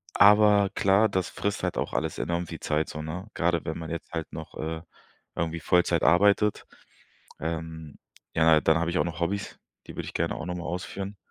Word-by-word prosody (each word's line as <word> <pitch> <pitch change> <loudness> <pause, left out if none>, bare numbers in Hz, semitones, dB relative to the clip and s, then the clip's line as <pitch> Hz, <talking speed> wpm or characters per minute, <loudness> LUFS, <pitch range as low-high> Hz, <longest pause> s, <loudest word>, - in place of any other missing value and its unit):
Aber 105 -1 +6
klar, 100 +2 +4
das 95 -2 -1
frisst 100 0 -2
halt - - -1
auch - - -2
alles 80 -1 -1
enorm 85 0 -2
viel - - -7
Zeit, 75 +1 -1
so, 75 - -6
ne? 90 +7 -6
Gerade 85 -1 +1
wenn 80 - -3
man 80 0 -6
jetzt 85 - -6
halt 80 -1 -4
noch, 80 0 -8
äh, 80 0 -4 0.5
irgendwie 85 0 -2
Vollzeit 90 0 +2
arbeitet. 100 +3 +4 0.8
Ähm, 80 -1 -5 0.4
ja, 80 -1 +5
dann 80 0 +4
habe 85 0 0
ich 90 - -3
auch - - +2
noch 85 -1 -5
Hobbys, 100 +4 -2 0.3
die - - -9
würde - - -4
ich - - -8
gerne - - 0
auch 80 - -6
nochmal 90 -1 -4
ausführen. 95 +3 -5
85 Hz, 195 wpm, -27 LUFS, 80-95 Hz, 0.8 s, Aber